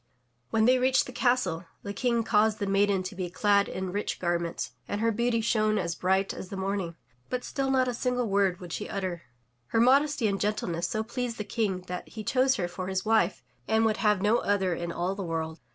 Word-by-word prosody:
When 220 0 +2
they 255 +1 +5
reached 260 +1 +3
the - - -8
castle, 245 -10 +1 0.2
the 200 - -4
King 235 +2 +1
caused 215 -1 +3
the 205 - -2
maiden 195 -1 +2
to 185 - -5
be 180 -1 -3
clad 200 +2 +2
in 185 -1 -4
rich 205 +2 -2
garments, 170 -1 -1 0.2
and 205 - -2
her 230 +1 +2
beauty 235 +1 +1
shone 215 -1 +2
as 170 -4 -1
bright 190 +3 +1
as 185 - -8
the 195 - -6
morning, 190 -3 -2 0.3
but 250 -1 -2
still 270 -1 -2
not 260 -1 +3
a 250 - -1
single 250 0 0
word 195 -3 +2
would 180 -2 -8
she 210 - -4
utter. 185 -4 -3 0.5
Her 225 - +1
modesty 275 +2 +4
and 195 -1 -1
gentleness 180 -5 -1
so 215 +4 -1
pleased 235 0 -4
the 210 - -3
King 205 -3 -1
that 180 0 -6
he 220 - -7
chose 260 +4 +3
her 180 -8 -1
for 180 +1 -6
his 190 +1 -2
wife 215 - +2 0.2
and 220 0 +3
would 220 -1 +2
have 210 -3 +2
no 215 +3 +4
other 195 -3 +1
in 170 0 -3
all 175 +3 -1
the 195 - -6
world. 160 -2 -3
205 Hz, 220 wpm, -28 LUFS, 185-230 Hz, 0.5 s, they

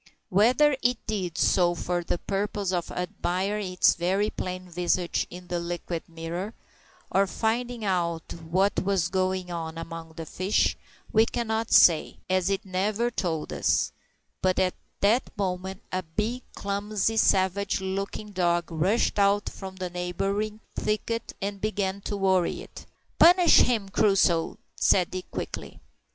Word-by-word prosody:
Whether 250 +9 +4
it 245 0 +2
did 190 -6 -3
so 175 -2 +3
for 175 0 -2
the 170 - -1
purpose 200 0 -2
of 175 -2 -1
admiring 185 +2 -2
its 180 - +5
very 190 +5 0
plain 185 0 -5
visage 175 0 0
in 180 +1 -10
the 175 -1 -2
liquid 170 -1 -4
mirror, 170 +5 -5 0.6
or 195 +1 +3
finding 235 +2 -1
out 170 -4 -1 0.2
what 190 +4 +2
was 190 -3 +1
going 185 -1 -1
on 165 -1 -5
among 165 -1 -7
the 165 0 -7
fish, 185 +5 +1 0.4
we 220 +1 +5
cannot 225 -1 -2
say, 165 -3 +5
as 185 0 +2
it 195 0 -1
never 205 +5 0
told 165 -8 -2
us; - - +1 0.5
but 185 0 +2
at 185 -1 +2 0.3
that 220 +6 +3
moment 190 +1 -3
a 185 - -1
big, 210 +9 -3
clumsy, 205 +1 -1
savage 195 -1 +2
looking 195 +2 -4
dog 175 -3 0
rushed 185 +7 +1
out 200 +1 +3
from 190 -1 -9
the 185 -1 -5
neighbouring 195 +5 -2
thicket 225 +2 -2
and 200 0 -3
began 200 -2 -1
to 205 - -3
worry 190 -3 +1
it. - - -12 0.3
"Punish 350 0 +7
him, 225 -5 +2
Crusoe," 195 -5 +2 0.2
said 180 -3 +3
Dick 185 0 -6
quickly. - - -6
190 Hz, 140 wpm, -27 LUFS, 180-210 Hz, 0.6 s, Punish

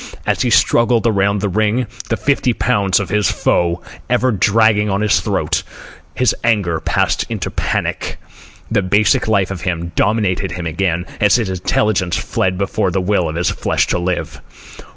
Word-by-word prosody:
As - - 0
he - - +1
struggled 115 0 +3
around 100 -2 +1
the 105 - 0
ring, 110 +5 0 0.2
the 115 - 0
fifty 135 -3 +1
pounds 100 -6 +1
of 100 - -4
his 105 -2 +1
foe 85 0 0 0.3
ever 125 +1 +2
dragging 105 +1 +3
on 100 +1 0
his 105 -1 +3
throat, - - -1 0.5
his 125 - +2
anger 100 -8 +1
passed - - 0
on - - -6
into - - -4
panic. - - -2 0.5
The 105 -3 +2
basic 105 +7 +2
life 100 -3 +1
of 95 -3 -5
him 85 -2 -3
dominated 100 -4 0
him 90 -1 -5
again, 85 +1 -1
and 105 -1 +3
his 115 -4 +2
intelligence 95 0 0
fled 95 -1 -1
before 95 -1 0
the 90 - -1
will 90 -3 0
of 80 - -5
his 85 +1 0
flesh - - 0
to - - 0
live. 90 0 -3
100 Hz, 170 wpm, -17 LUFS, 90-110 Hz, 0.5 s, struggled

